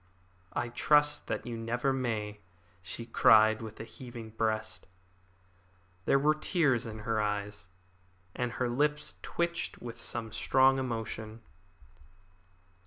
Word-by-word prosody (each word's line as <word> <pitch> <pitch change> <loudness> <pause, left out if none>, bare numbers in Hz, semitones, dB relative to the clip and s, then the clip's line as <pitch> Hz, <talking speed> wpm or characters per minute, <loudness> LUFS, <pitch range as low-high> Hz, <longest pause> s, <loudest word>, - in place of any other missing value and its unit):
"I 120 - -1
trust 150 +4 +3
that - - -3
you 120 -1 -4
never 120 +4 0
may," 110 -5 -2 0.4
she 95 +5 -6
cried, 110 -2 +5
with 110 -1 -8
a - - -4
heaving 115 0 -9
breast. 110 -4 -2 1.2
There - - +4
were 150 +2 +4
tears 155 - +1
in 110 -1 -7
her 110 -2 +1
eyes, 105 -1 -3 0.7
and 125 -1 -2
her 125 - -1
lips 150 +5 0
twitched 170 0 -2
with 120 -1 -7
some 115 -2 -2
strong 135 +3 +4
emotion. 110 -3 -4
115 Hz, 120 wpm, -31 LUFS, 110-130 Hz, 1.2 s, cried